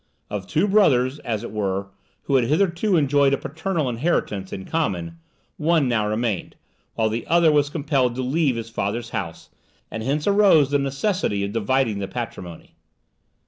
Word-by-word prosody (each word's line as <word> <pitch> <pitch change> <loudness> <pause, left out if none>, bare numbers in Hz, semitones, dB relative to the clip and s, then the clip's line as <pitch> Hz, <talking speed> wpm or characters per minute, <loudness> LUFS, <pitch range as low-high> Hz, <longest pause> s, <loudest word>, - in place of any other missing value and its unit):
Of 100 -2 -4
two 170 +7 +1
brothers, 145 -10 +3
as 110 -3 -3
it - - -6
were, 100 -2 -2 0.4
who 140 - -3
had 125 -3 +4
hitherto 175 - +1
enjoyed 140 -2 +3
a - - -6
paternal 160 +1 -3
inheritance 115 - -1
in 95 - -6
common, 90 - -2 0.4
one 160 -3 +2
now 110 -4 +1
remained, 110 -2 -2 0.4
while 110 - +1
the 110 +2 -3
other 170 -1 +4
was 145 -1 +2
compelled 140 -5 0
to 130 - -2
leave 140 0 +1
his 115 0 -6
father's 115 +3 -3
house, 85 -4 -5 0.4
and 110 - -4
hence 140 +6 -1
arose 200 -9 +4
the 145 - +3
necessity 140 - -1
of 100 - -5
dividing 115 -1 0
the 100 - -3
patrimony. 90 -8 -7
130 Hz, 165 wpm, -23 LUFS, 110-155 Hz, 0.4 s, had